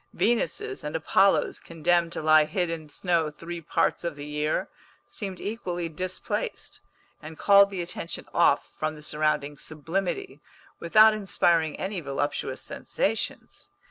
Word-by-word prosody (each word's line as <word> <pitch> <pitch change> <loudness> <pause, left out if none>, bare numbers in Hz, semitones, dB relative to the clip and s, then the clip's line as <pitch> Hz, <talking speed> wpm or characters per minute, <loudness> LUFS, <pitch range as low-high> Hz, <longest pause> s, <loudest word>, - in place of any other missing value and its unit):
Venuses 400 - 0
and 150 - -4
Apollos 190 +5 +3
condemned 170 +1 +1
to - - -4
lie 155 0 +6
hid 175 0 -1
in 160 -2 -6
snow 165 0 0
three 170 +3 -7
parts 160 - 0
of 170 -3 -3
the 145 0 -8
year 150 +5 -1 0.4
seemed 195 -3 -5
equally 180 -6 -3
displaced, 185 - -4 0.4
and 155 0 -9
called 200 0 +6
the 190 -3 -3
attention 170 -1 -5
off 170 -4 +3
from 155 0 -1
the 150 - -12
surrounding 150 -1 0
sublimity, 160 -1 -3 0.4
without 215 +6 +6
inspiring 170 -6 +1
any 195 0 -3
voluptuous 145 0 -3
sensations. - - -3
170 Hz, 135 wpm, -26 LUFS, 155-190 Hz, 0.4 s, lie